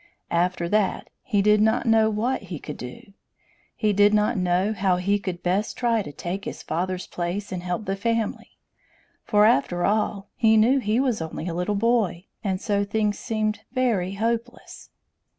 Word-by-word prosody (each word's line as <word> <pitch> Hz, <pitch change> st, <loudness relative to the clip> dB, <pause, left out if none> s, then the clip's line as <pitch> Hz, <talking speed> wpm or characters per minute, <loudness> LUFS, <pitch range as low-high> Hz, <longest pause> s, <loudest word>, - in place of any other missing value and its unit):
After 175 Hz, 0 st, +1 dB
that, 210 Hz, +1 st, 0 dB
he 205 Hz, -6 st, +1 dB
did 210 Hz, 0 st, +4 dB
not 220 Hz, +1 st, +2 dB
know 225 Hz, -1 st, +4 dB
what 225 Hz, +5 st, -1 dB
he 170 Hz, -, -4 dB
could -, -, -8 dB
do! 200 Hz, -, -10 dB, 0.6 s
He 210 Hz, -2 st, +1 dB
did 205 Hz, +1 st, +5 dB
not 210 Hz, +3 st, +2 dB
know 185 Hz, +2 st, +1 dB
how 190 Hz, -2 st, +1 dB
he 200 Hz, +3 st, +1 dB
could 185 Hz, -3 st, -5 dB
best 190 Hz, +4 st, 0 dB
try 235 Hz, -2 st, +1 dB
to 170 Hz, -, -7 dB
take 175 Hz, +7 st, -5 dB
his -, -, -6 dB
father's 180 Hz, +3 st, -2 dB
place 180 Hz, +4 st, -4 dB
and 180 Hz, -2 st, -3 dB
help 180 Hz, +4 st, -3 dB
the 195 Hz, -, -1 dB
family; 230 Hz, +2 st, -2 dB, 0.7 s
for, 210 Hz, -2 st, +4 dB
after 175 Hz, -3 st, +2 dB
all, 205 Hz, -1 st, 0 dB
he 220 Hz, -1 st, +4 dB
knew 245 Hz, +6 st, +4 dB
he 220 Hz, -1 st, 0 dB
was 255 Hz, -8 st, 0 dB
only 160 Hz, +1 st, -5 dB
a 170 Hz, -, -2 dB
little 180 Hz, +4 st, -1 dB
boy, 205 Hz, -5 st, +1 dB, 0.2 s
and 190 Hz, -3 st, -1 dB
so 205 Hz, -1 st, 0 dB
things 210 Hz, 0 st, -1 dB
seemed 215 Hz, -2 st, -1 dB
very 225 Hz, -8 st, +1 dB
hopeless! 230 Hz, +3 st, -4 dB
205 Hz, 175 wpm, -24 LUFS, 180-220 Hz, 0.7 s, did